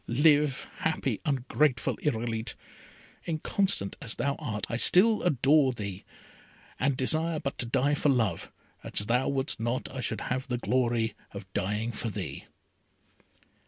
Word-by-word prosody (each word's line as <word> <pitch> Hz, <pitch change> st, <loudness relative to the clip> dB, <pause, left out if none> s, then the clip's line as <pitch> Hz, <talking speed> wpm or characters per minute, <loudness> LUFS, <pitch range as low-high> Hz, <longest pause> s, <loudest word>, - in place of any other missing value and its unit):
Live 145 Hz, +2 st, +3 dB
happy, 140 Hz, -7 st, -1 dB
ungrateful 135 Hz, -1 st, +1 dB
Irolite! 115 Hz, -4 st, -2 dB, 0.7 s
Inconstant 165 Hz, -, 0 dB
as 115 Hz, -6 st, -3 dB
thou 140 Hz, -, 0 dB
art, 105 Hz, -4 st, -3 dB
I -, -, -3 dB
still 210 Hz, -, +5 dB
adore 140 Hz, -3 st, +3 dB
thee, 100 Hz, -4 st, -6 dB, 0.7 s
and 135 Hz, 0 st, +1 dB
desire 160 Hz, +5 st, +1 dB
but 140 Hz, +1 st, -4 dB
to 120 Hz, -, -2 dB
die 135 Hz, +4 st, +2 dB
for 145 Hz, 0 st, +1 dB
love, 115 Hz, -10 st, 0 dB, 0.3 s
as 105 Hz, -, +2 dB
thou 125 Hz, +4 st, +1 dB
wouldst 135 Hz, -2 st, 0 dB
not 120 Hz, +3 st, -1 dB
I 130 Hz, -, -3 dB
should -, -, -2 dB
have 130 Hz, +2 st, -2 dB
the 125 Hz, -2 st, -1 dB
glory 120 Hz, -3 st, +1 dB, 0.2 s
of 100 Hz, -1 st, -7 dB
dying 105 Hz, +5 st, -1 dB
for 115 Hz, +1 st, -4 dB
thee!" 100 Hz, -, -6 dB
130 Hz, 140 wpm, -28 LUFS, 115-145 Hz, 0.7 s, still